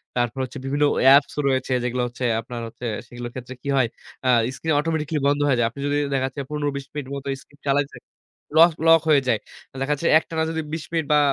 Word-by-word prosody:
তারপর 120 +1 -1
হচ্ছে 130 - -6
বিভিন্ন 145 +2 0 0.2
অ্যাপস 140 +2 +6
রয়েছে 130 -1 0
যেগুলো 125 0 -1
হচ্ছে 125 +1 -5 0.2
আপনার 120 0 -7
হচ্ছে 115 +2 -9 0.2
সেগুলোর 120 0 -7
ক্ষেত্রে 130 0 -7
কি - - -9
হয়। 130 -3 +3 0.4
আ - - +4 0.3
স্ক্রিন 160 +2 -1
অটোমেটিক্যালি 155 -1 -1
বন্ধ 145 0 +2
হয়ে 135 -3 +3
যায়। 115 - +3
আপনি 135 - -13
যদি 145 0 +1 0.2
দেখা 135 -1 +1
যাচ্ছে 135 +2 -6
১৫-২০ 145 -2 -3
মিনিট 145 -3 -5
মতো 140 0 -7
স্ক্রিন 145 +1 -23
চালাইছেন। 140 0 0 0.6
লস 165 +1 +7
লক 165 0 +7
হয়ে 145 -3 +6
যায়। 115 -3 +2 0.4
দেখা 140 +2 +1
যাচ্ছে 165 +4 -2
একটানা 160 0 -3
যদি 160 0 -2
২০ 160 -1 -3
মিনিট 165 -2 0
বা 150 - +6
140 Hz, 205 wpm, -23 LUFS, 125-150 Hz, 0.6 s, লস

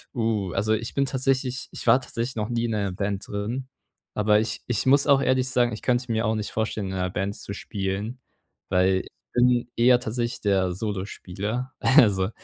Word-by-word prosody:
Uh, 110 -5 0
also 110 +3 +1
ich 115 +2 -2
bin 140 0 +2
tatsächlich 130 -2 -1
ich - - -7
war 130 - +6
tatsächlich 120 0 -4
noch 110 0 -2
nie 120 0 0
in 115 -2 -1
einer 100 -2 -1
Band 100 +1 -3
drin, 120 +6 -4 0.4
aber 105 0 +3
ich 110 - -3
ich 120 -1 -1
muss 140 +2 +4
auch 140 -1 +5
ehrlich 130 -1 +2
sagen, 120 -2 +2
ich 110 - -6
könnte 125 -1 0
mir 110 +1 0
auch 110 +1 +1
nicht 105 -1 -3
vorstellen, 110 -2 -2
in 95 - -4
einer 90 -1 -1
Band 95 +2 -2
zu 100 - -7
spielen, 100 +4 -4 0.5
weil 95 +1 +2
ich - - -13 0.2
bin 120 0 +3
eher 120 +1 +5
tatsächlich 120 +1 -3
der 95 -3 +1
Solospieler. 105 +4 -4
Also, 105 -9 +4
110 Hz, 195 wpm, -25 LUFS, 100-125 Hz, 0.5 s, war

